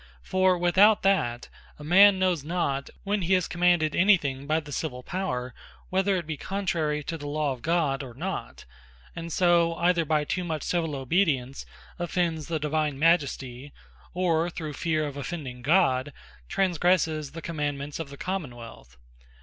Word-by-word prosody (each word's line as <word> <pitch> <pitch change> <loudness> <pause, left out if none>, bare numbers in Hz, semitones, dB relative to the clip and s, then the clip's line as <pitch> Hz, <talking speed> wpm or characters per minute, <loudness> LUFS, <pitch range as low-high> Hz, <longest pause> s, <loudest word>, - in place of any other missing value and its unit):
For 185 -1 +2
without 190 +5 +4
that, 160 -12 +1 0.3
a 150 - -11
man 190 +5 +6
knows 185 -5 +1
not, 145 -4 -2
when 205 0 -1
he 185 +2 +2
is 185 -2 0
commanded 175 -3 +2
any 195 +2 +6
thing 140 -3 -5
by 155 +1 +2
the 150 -2 -11
Civill 130 -4 -4
Power, 125 -10 -3 0.4
whether 190 +1 +2
it 175 -3 -2
be 155 -1 -4
contrary 165 -6 -2
to 165 +2 -5
the 145 - -6
Law 150 -1 -1
of 125 - -12
God, 155 -3 0
or 125 -4 -9
not: 185 +7 -5 0.5
and 165 0 -6
so, 170 -1 +3
either 175 0 +2
by 155 -1 +1
too 180 +5 -2
much 160 -3 -3
civill 165 -4 -1
obedience, 135 -2 0 0.3
offends 170 -3 -1
the 165 - -1
Divine 150 -1 -1
Majesty, 140 -4 0 0.4
or 170 -2 +1
through 155 -3 -6
feare 155 0 -1
of 145 -1 -6
offending 135 -3 -6
God, 145 -3 +2 0.4
transgresses 165 -5 +1
the 165 - -7
commandements 145 -2 -3
of 160 -4 -5
the 140 - -10
Common 180 -9 -4
wealth. 115 - -12
160 Hz, 165 wpm, -26 LUFS, 140-180 Hz, 0.5 s, man